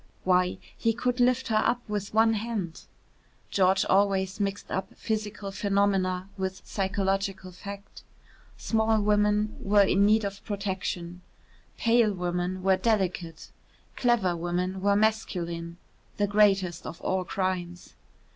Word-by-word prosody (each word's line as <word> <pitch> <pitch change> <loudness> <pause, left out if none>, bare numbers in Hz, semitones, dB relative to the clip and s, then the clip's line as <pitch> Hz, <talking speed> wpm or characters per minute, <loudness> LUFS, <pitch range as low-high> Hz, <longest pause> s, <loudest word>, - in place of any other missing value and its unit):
Why, 180 0 +2 0.2
he 230 - +1
could 245 +2 -1
lift 250 +1 +2
her 215 -1 +3
up 240 - +1
with 205 -1 -3
one 225 +1 +4
hand. 210 -6 -4 0.7
George 190 0 +3
always 195 0 +2
mixed 200 0 -3
up 190 - -3
physical 210 -2 -3
phenomena 195 -2 +1
with 190 0 -4
psychological 195 -1 -2
fact. 200 +2 -10 0.6
Small 220 -1 +1
women 210 0 +2
were 205 0 +4
in 195 0 +3
need 215 +1 +4
of 195 0 -6
protection; 185 -3 -4 0.6
pale 230 -2 +3
women 180 +1 -2
were 190 0 +4
delicate; 185 -5 -1 0.4
clever 230 -8 +2
women 180 +2 -2
were 200 +1 +3
masculine 175 -6 -1 0.4
the 205 - +2
greatest 195 -4 +2
of 165 - -8
all 185 0 0
crimes. 180 -1 -3
195 Hz, 125 wpm, -27 LUFS, 185-210 Hz, 0.7 s, one